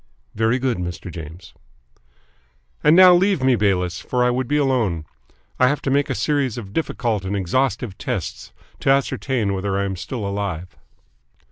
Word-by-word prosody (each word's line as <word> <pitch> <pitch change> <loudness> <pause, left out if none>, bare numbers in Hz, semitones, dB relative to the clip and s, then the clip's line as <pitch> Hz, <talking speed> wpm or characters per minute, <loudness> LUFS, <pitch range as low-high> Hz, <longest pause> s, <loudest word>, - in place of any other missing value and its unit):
"Very 115 +3 +1
good, 130 -5 -1
Mr. 90 0 -5
James." 80 +2 -10 1.3
"And 150 - +6
now 185 0 +9
leave 185 -4 +2
me, 130 -1 +4
Bayliss, 90 -5 0
for 125 -1 0
I 125 - +3
would 125 0 -1
be 150 - +1
alone. 115 - 0 0.5
I 125 - +5
have 145 +3 +1
to 135 - 0
make 140 +1 +2
a - - -1
series 140 -6 0
of 100 -4 -8
difficult 115 -9 -1
and 95 +2 -3
exhaustive 105 +2 -1
tests - - -4 0.3
to - - 0
ascertain 130 -5 +1
whether 95 0 -2
I 100 - 0
am 95 -1 -3
still 110 +4 -5
alive." 95 -4 -4
115 Hz, 165 wpm, -21 LUFS, 95-135 Hz, 1.3 s, now